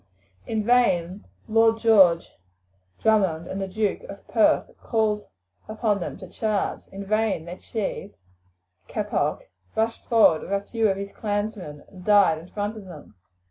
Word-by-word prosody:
In 220 -1 -1
vain 195 -6 +2 0.2
Lord 225 0 +4
John 195 -7 +5 0.8
Drummond 190 -7 +2
and 195 +2 -5
the 195 - -2
Duke 210 +2 -1
of - - -11
Perth - - +2
called 215 -2 0 0.4
upon 215 -1 0
them 175 - -5
to 185 - -10
charge, 215 +1 -2
in 195 +1 -7
vain 215 -4 0
their 175 +2 -8
chief, 205 -2 -4 0.8
Keppoch, - - -1 0.3
rushed 225 +1 -1
forward 220 -9 +5
with - - -5
a 200 - +1
few 220 +1 0
of 195 - 0
his 200 0 -6
clansmen 205 -8 -4
and 185 -2 -14
died 200 -5 +5
in 165 - -13
front 205 +3 -4
of 210 - -10
them. 155 - -12
205 Hz, 150 wpm, -24 LUFS, 185-220 Hz, 0.8 s, John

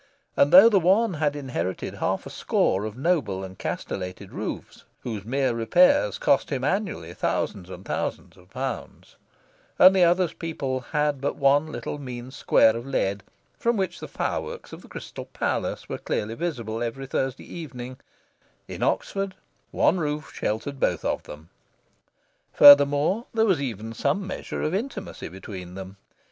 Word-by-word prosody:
and 140 - +4
though 190 +5 +10
the 210 -4 +5
one 195 +5 +3
had 150 -2 0
inherited 130 -9 -3
half - - -2
a - - -7
score 95 +3 +1
of 110 +1 -6
noble 130 - 0
and 95 0 -9
castellated 90 -1 -5
roofs, - - -6 0.2
whose 110 -5 -5
mere 130 +2 0
repairs 115 - +4
cost 140 - +2
him 130 -3 -2
annually 160 - -2
thousands 90 +1 -2
and 95 +1 -9
thousands - - -4
of 90 0 -20
pounds, 130 0 -6 0.6
and 185 +1 +8
the 185 - +5
other's 175 0 +3
people 140 -6 -3
had 150 +1 -1
but 140 - -1
one 145 +2 +3
little 150 - -5
mean 125 -2 -7
square 115 -4 +4
of 115 - -4
lead, 100 -7 -1 0.4
from 235 -1 +1
which 185 -3 -2
the - - -7
fireworks - - -4
of - - -9
the - - -15
Crystal - - -8
Palace - - -3
were - - -5
clearly 110 +2 -2
visible 115 -7 -3
every 120 +3 -3
Thursday 135 -1 -2
evening, 130 -6 -8 0.7
in - - -7
Oxford 195 -1 -1 0.3
one 180 - +2
roof 150 -1 -3
sheltered 130 +6 -3
both 90 -9 0
of - - 0
them. 75 +3 -12 1.0
Furthermore, 145 - +7
there 225 0 +4
was 185 -9 +2
even 115 -4 -4
some 195 - 0
measure 190 - -5
of 155 - -1
intimacy 205 -1 -4
between 90 0 -9
them. 95 0 -8
135 Hz, 155 wpm, -25 LUFS, 110-170 Hz, 1.0 s, though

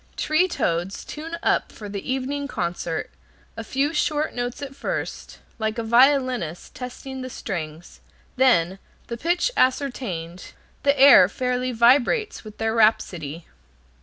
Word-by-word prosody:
Tree 310 +4 +2
toads 175 - -2
tune 325 +3 -6
up - - +1
for 210 - -9
the 200 +5 -5
evening 275 +2 -2
concert, 170 - -3 0.4
a 225 - -6
few 275 +7 -1
short 305 0 0
notes 245 0 -4
at 275 -1 -7
first, - - -5 0.2
like 220 +1 -2
a 230 - -2
violinist 250 - +2
testing 260 +1 -7
the 255 - -6
strings, 160 -7 -6 0.4
then, 195 -9 +3 0.3
the 235 - -3
pitch 345 - 0
ascertained, 235 - -1 0.3
the 280 -1 +2
air 270 -9 +8
fairly 250 +2 -1
vibrates 250 - +3
with 215 -1 -11
their 225 0 -1
rhapsody. 175 -8 +1
245 Hz, 135 wpm, -23 LUFS, 195-275 Hz, 0.4 s, air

